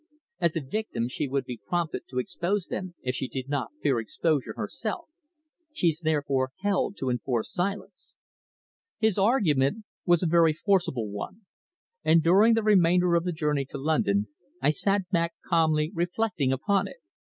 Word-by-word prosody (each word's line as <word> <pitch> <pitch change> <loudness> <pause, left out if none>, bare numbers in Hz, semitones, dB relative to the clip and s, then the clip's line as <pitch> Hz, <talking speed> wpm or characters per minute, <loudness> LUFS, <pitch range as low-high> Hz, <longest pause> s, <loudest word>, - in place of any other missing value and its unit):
"As 170 - +1
a 165 - -1
victim, 135 - -3
she 140 +3 -3
would 135 +1 -1
be 120 -4 -7
prompted 170 +6 -2
to 130 - -7
expose 175 +9 -1
them 185 -2 -5
if 125 - -1
she 130 - -3
did 130 0 -5
not 140 -5 -2
fear 135 -5 +2
exposure 125 +1 -1
herself. 210 - -4 0.7
She's 165 - +1
therefore 140 -4 0
held 200 0 0
to 130 -2 -1
enforced 120 -1 -2
silence." 195 +1 -4 0.8
His 220 -3 +1
argument 195 - +2 0.2
was 175 0 +4
a - - +2
very 165 -1 +4
forcible 160 - 0
one, 185 - -6 0.6
and 160 0 +4
during 200 +7 +5
the 225 - +1
remainder 180 -4 +4
of 170 0 +2
the 180 - 0
journey 150 -4 -1
to - - -8
London 105 -9 +1 0.3
I - - +3
sat 195 +5 +1
back 170 -2 0
calmly 160 -2 +2
reflecting 175 -4 0
upon 200 +9 +1
it. - - -11
165 Hz, 160 wpm, -27 LUFS, 135-190 Hz, 0.8 s, during